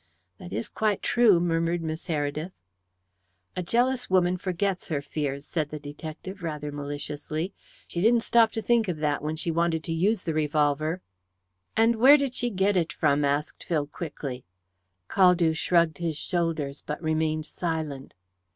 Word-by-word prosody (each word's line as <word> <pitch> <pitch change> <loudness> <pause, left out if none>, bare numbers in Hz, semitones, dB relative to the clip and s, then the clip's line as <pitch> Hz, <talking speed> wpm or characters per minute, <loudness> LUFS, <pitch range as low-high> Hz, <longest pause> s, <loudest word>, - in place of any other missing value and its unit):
"That - - -9
is 110 +4 -2
quite 215 -3 -1
true," 225 -7 +5
murmured 170 0 0
Miss 160 +2 -4
Heredith. 155 +2 -2 1.0
"A - - -1
jealous 245 +7 +1
woman 180 -1 +3
forgets 185 +1 -2
her 155 -3 -1
fears," 140 0 -3
said 155 -3 -2
the 150 - -5
detective 155 +6 -8
rather 150 -3 -4
maliciously. 145 +4 -4 0.3
"She 170 - -3
didn't 230 +3 +4
stop 230 -2 +4
to 225 - -3
think 235 -2 +3
of 175 -3 -2
that 150 -1 0
when 155 +2 -2
she 165 +1 -1
wanted 165 -1 +1
to 165 - -3
use 190 +5 +1
the 165 - -2
revolver." 155 +2 +1 0.8
"And 225 +1 +4
where 270 +6 +8
did 275 -3 -1
she 245 -1 0
get 200 -1 +1
it 170 -3 +1
from?" 145 +1 +2
asked 145 +1 -1
Phil 155 -4 0
quickly. 145 -5 -6 0.6
Caldew 180 - +4
shrugged 170 -1 +2
his 165 -3 -2
shoulders, 160 -5 -2
but 150 - -4
remained 155 0 0
silent. 160 -7 -4
165 Hz, 160 wpm, -27 LUFS, 150-185 Hz, 1.0 s, where